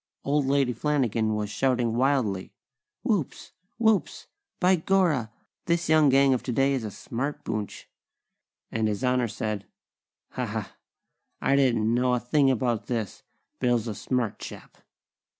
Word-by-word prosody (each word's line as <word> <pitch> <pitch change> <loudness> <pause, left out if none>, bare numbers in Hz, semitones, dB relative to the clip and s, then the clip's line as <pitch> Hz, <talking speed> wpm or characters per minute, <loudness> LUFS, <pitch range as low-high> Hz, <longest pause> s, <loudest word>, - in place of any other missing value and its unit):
Old 140 -1 +1
Lady 135 -2 +2
Flanagan 115 -5 0
was 105 -1 -3
shouting 125 -1 +1
wildly: 120 -7 +1 0.5
"Whoops! - - -2 0.3
Whoops! 220 -3 +1 0.3
By 185 +1 +4
gorra! 165 - +1 0.4
This 170 -1 0
young 155 -2 +5
gang 135 0 +5
of 125 - 0
today 135 +2 +1
is 130 -4 -1
a 110 - -3
smart 130 +8 -5
boonch!" 105 -2 -5 0.8
and 110 -1 0
His 105 +3 -2
Honor 125 -1 +2
said: 105 -2 -4 0.6
"Ha, - - -3
ha! - - -5 0.6
I 135 - +2
didn't 115 -5 +2
know 125 +1 +2
a - - 0
thing 135 +3 +2
about 120 -3 0
this! 115 -5 -3 0.4
Bill's 120 -2 +1
a 110 - -2
smart 120 +1 -2
chap!" - - -10
125 Hz, 140 wpm, -26 LUFS, 110-140 Hz, 0.8 s, young